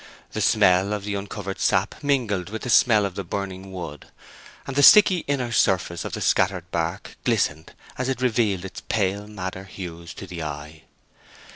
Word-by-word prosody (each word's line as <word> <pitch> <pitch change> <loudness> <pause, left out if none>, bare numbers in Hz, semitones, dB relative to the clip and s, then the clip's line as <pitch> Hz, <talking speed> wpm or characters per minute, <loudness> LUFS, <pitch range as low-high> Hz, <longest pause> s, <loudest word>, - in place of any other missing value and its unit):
The - - -3
smell 95 +3 +4
of 105 -2 -3
the 105 0 -3
uncovered 100 -1 -5
sap 95 +9 0
mingled 115 -10 0
with 110 +1 -6
the 125 - -2
smell 110 -5 +5
of 100 - -3
the 100 - -5
burning 95 +1 -5
wood, 85 -6 -7 0.6
and 135 - -6
the 145 - +3
sticky 195 +2 +8
inner 130 -4 -1
surface 85 -6 +1
of - - -6
the - - -4
scattered 90 -2 +1
bark 85 0 -3
glistened 80 +2 0 0.3
as 130 +1 -1
it 130 -2 -2
revealed 110 -7 +1
its 95 - -8
pale 100 -1 0
madder 95 -2 -6
hues 85 -4 -8
to - - -8
the 85 -2 -7
eye. 75 +1 -7
95 Hz, 175 wpm, -24 LUFS, 90-110 Hz, 0.6 s, sticky